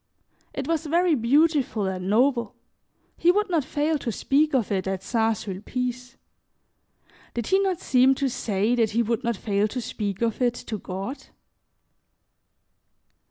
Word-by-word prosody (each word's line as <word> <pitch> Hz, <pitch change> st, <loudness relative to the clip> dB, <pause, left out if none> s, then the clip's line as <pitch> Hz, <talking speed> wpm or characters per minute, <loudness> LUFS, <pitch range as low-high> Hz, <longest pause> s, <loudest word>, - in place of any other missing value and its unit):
It -, -, -5 dB
was 320 Hz, -1 st, -1 dB
very 340 Hz, +2 st, +3 dB
beautiful 275 Hz, -3 st, +2 dB
and 185 Hz, 0 st, -3 dB
noble; 235 Hz, 0 st, +2 dB, 0.6 s
he 345 Hz, -, +4 dB
would 415 Hz, +1 st, 0 dB
not 325 Hz, -4 st, +2 dB
fail 300 Hz, +2 st, 0 dB
to 240 Hz, -, -3 dB
speak 285 Hz, +6 st, +1 dB
of 235 Hz, -6 st, 0 dB
it 190 Hz, -1 st, -1 dB
at 190 Hz, -1 st, -3 dB
St. 225 Hz, 0 st, +1 dB
Sulpice. 250 Hz, +6 st, -5 dB, 1.2 s
Did 235 Hz, -2 st, -2 dB
he 385 Hz, -, +3 dB
not 385 Hz, -3 st, 0 dB
seem 260 Hz, +1 st, +4 dB
to 275 Hz, -, 0 dB
say 215 Hz, -2 st, 0 dB
that 230 Hz, -3 st, +2 dB
he 230 Hz, +3 st, +1 dB
would 230 Hz, 0 st, -1 dB
not 235 Hz, -3 st, -1 dB
fail 205 Hz, 0 st, 0 dB
to 250 Hz, -, -4 dB
speak 210 Hz, -3 st, -3 dB
of 230 Hz, +1 st, -1 dB
it 245 Hz, -1 st, +2 dB
to 215 Hz, -3 st, -6 dB
God? 195 Hz, +10 st, -6 dB
240 Hz, 155 wpm, -25 LUFS, 210-290 Hz, 1.2 s, he